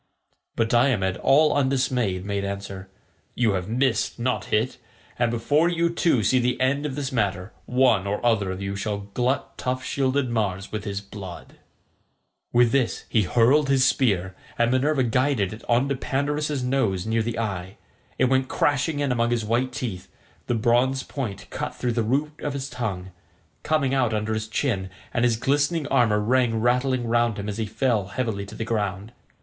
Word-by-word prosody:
But 115 - +1
Diomed 115 -6 +2
all 150 +3 +4
undismayed 130 -8 0
made 100 -1 -2
answer, 100 -1 -6 0.5
"You 115 -3 +2
have 95 0 -2
missed, 125 -1 0
not 120 -4 -1
hit, 110 +4 0 0.4
and 120 -1 +3
before 145 +8 +2
you 170 -1 +1
two 165 -9 +2
see 130 +5 +3
the 125 0 0
end 140 +3 +1
of 135 - -5
this 140 -2 -3
matter 100 -4 -1
one 125 -6 +3
or 105 +1 -1
other 105 -5 +2
of 95 +1 -4
you 100 0 -3
shall 100 0 -4
glut 125 +4 -1
tough 130 0 -2
shielded 135 0 0
Mars 105 -4 -2
with 105 -1 -4
his 100 -1 -3
blood." 100 -3 -10 0.9
With 120 -1 +4
this 135 -4 0
he 110 - +3
hurled 125 +9 +3
his 135 -1 +4
spear, 95 -9 +1 0.2
and 120 0 +2
Minerva 135 +2 +2
guided 125 -4 +1
it 110 - -10
on 120 +3 +3
to 140 - +1
Pandarus's 145 +1 -1
nose 115 -8 0
near 110 +1 +1
the 115 +1 -3
eye. 95 -4 -4 0.4
It - - +3
went 130 0 +2
crashing 145 +2 0
in 140 -2 0
among 120 -1 +1
his 120 -2 0
white 120 +4 0
teeth; 100 -7 -5 0.4
the 120 - +1
bronze 125 +4 +2
point 115 -9 -5
cut - - -4
through 120 -1 -1
the 115 - +1
root 145 +7 -1
of 145 - -2
his 140 0 -5
tongue, 95 -6 -4 0.5
coming 155 -4 +1
out 125 -5 +2
under 105 +1 -1
his 110 0 -3
chin, 110 -5 -1 0.2
and 120 - +1
his 120 -2 +3
glistening 145 +5 +1
armour 110 -4 +3
rang 115 +1 +2
rattling 125 +1 +1
round 120 -1 +1
him 100 0 -5
as 105 +1 -4
he 110 - -1
fell 110 -3 0
heavily 100 -1 -3
to - - -10
the 115 - -4
ground. 105 -2 -2
120 Hz, 180 wpm, -24 LUFS, 105-130 Hz, 0.9 s, all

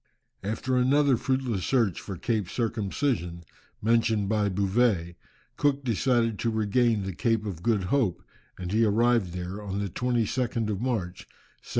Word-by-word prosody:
After 110 +6 -1
another 135 +2 +4
fruitless 125 -6 -1
search 115 -10 +1
for 95 -3 -6
Cape 105 -2 -1
Circumcision, 105 - -2 0.4
mentioned 110 -2 +2
by 105 -1 +1
Bouvet, 95 -2 +1 0.4
Cook 140 -1 +1
decided 115 -2 +1
to 115 - 0
regain 110 0 +1
the 95 -1 -4
Cape 115 +2 0
of 90 -5 -5
Good 105 -1 +1
Hope, 105 -2 0 0.3
and 90 0 -5
he 110 +2 +3
arrived 115 -2 +2
there 90 +3 -5
on 100 -1 -4
the 100 -1 -2
22nd 120 0 -1
of 100 0 -3
March, 105 -8 -3 0.3
1775. - - -21
110 Hz, 145 wpm, -27 LUFS, 95-120 Hz, 0.4 s, another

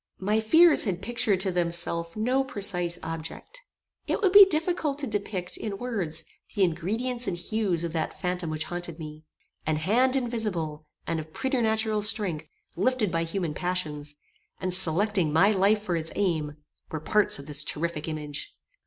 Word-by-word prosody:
My 210 +3 0
fears 320 +9 +6
had 190 -2 -3
pictured 225 -4 +1
to 190 -1 0
themselves 170 -1 +1
no 250 +5 +1
precise 180 -8 +1
object. 165 - -7 0.5
It - - 0
would 390 -5 +2
be 405 +1 +10
difficult 315 -3 0
to 290 - -3
depict, 200 -5 -3
in 205 -3 -5
words, 190 -10 -1 0.3
the 200 - +2
ingredients 225 +9 -1
and 175 - -2
hues 190 -3 -1
of 170 -1 -4
that 160 -2 -3
phantom 180 -2 -2
which 155 0 -2
haunted 175 -2 -5
me. 155 -1 -9 0.4
An 155 - 0
hand 235 - +2
invisible 200 - -3 0.2
and 165 - -2
of 155 0 -9
preternatural 220 -5 0
strength, 200 -8 +1 0.3
lifted 230 0 0
by 165 0 0
human 165 -2 -3
passions, 150 -5 -3 0.4
and 185 -1 -1
selecting 185 0 +4
my 190 +7 +4
life 205 +1 +2
for 180 -4 -1
its 165 0 -2
aim, 160 -7 -1 0.4
were 155 - -4
parts 210 +6 +2
of 140 - -10
this 150 0 -1
terrific 160 0 -3
image. 150 -2 -6
185 Hz, 160 wpm, -26 LUFS, 165-220 Hz, 0.5 s, be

